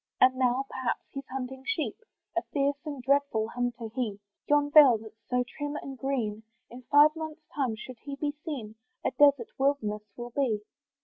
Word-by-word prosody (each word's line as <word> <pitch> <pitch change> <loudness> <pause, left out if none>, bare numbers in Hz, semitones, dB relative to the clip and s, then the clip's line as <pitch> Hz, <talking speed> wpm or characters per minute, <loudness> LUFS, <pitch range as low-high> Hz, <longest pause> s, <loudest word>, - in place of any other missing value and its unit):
And 255 0 +7
now, 255 +1 +2
perhaps, 260 -2 -2
he's 275 -1 -7
hunting 265 0 -5
sheep, 350 +2 -1 0.4
A 345 - +2
fierce 280 0 +1
and 285 -4 -5
dreadful 275 -5 +2
hunter 245 -1 -2
he! 230 -6 -2 0.3
Yon 290 0 +3
valley, 285 -6 +9
that's 220 0 -15
so 250 0 +2
trim 290 +3 -5
and 275 -2 -6
green, 245 -6 -2 0.3
In 245 +2 -9
five 295 +2 +7
months' 315 0 -6
time, 260 -6 0
should 235 +2 -10
he 280 +2 -6
be 290 +1 -1
seen, 250 -10 -5 0.3
A - - +2
desart 280 -5 +4
wilderness 265 -7 +1 0.2
will 240 0 -6
be. 230 -6 0
265 Hz, 175 wpm, -29 LUFS, 240-285 Hz, 0.4 s, valley